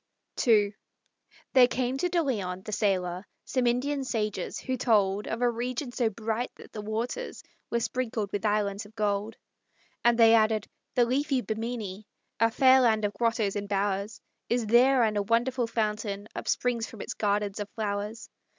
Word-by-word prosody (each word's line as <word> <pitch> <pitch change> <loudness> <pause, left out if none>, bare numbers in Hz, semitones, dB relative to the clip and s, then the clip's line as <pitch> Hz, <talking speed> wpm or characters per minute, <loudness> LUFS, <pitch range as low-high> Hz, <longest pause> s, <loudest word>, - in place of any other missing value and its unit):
II 210 -3 +5 0.8
There 255 -2 +7
came 255 +1 -1
to 360 - +1
De 345 -1 +1
Leon, 190 -9 -2
the 215 - -6
sailor, 185 -4 0 0.2
Some 255 -2 0
Indian 270 +4 0
sages, 215 -5 -2
who 260 - -3
told 210 -5 +2
Of 230 +2 -2
a 245 - +4
region 245 +3 -3
so 240 -2 +1
bright 225 +3 -3
that - - -14
the 210 - -5
waters 230 - -4 0.3
Were 235 - 0
sprinkled 230 -5 -2
with 205 - -3
islands 205 -1 0
of 215 - -22
gold. 210 0 -1 0.7
And 235 -1 +4
they 225 -1 +7
added: 220 -1 +3 0.3
"The 245 - +5
leafy 270 +2 +1
Bimini, 220 -3 -4 0.3
A 230 +1 +4
fair 260 +2 +5
land 220 -3 +3
of 205 - -1
grottos 220 -2 0
and 205 0 -4
bowers, 200 +1 -1 0.3
Is 240 -1 +1
there; 245 +3 +5
and 215 -2 +1
a - - +2
wonderful 235 +3 +1
fountain 210 -2 -2
Upsprings 240 -2 -1
from 220 - -10
its - - -5
gardens 205 -1 -1
of 205 0 -4
flowers. 210 +1 -3
225 Hz, 170 wpm, -28 LUFS, 205-245 Hz, 0.8 s, There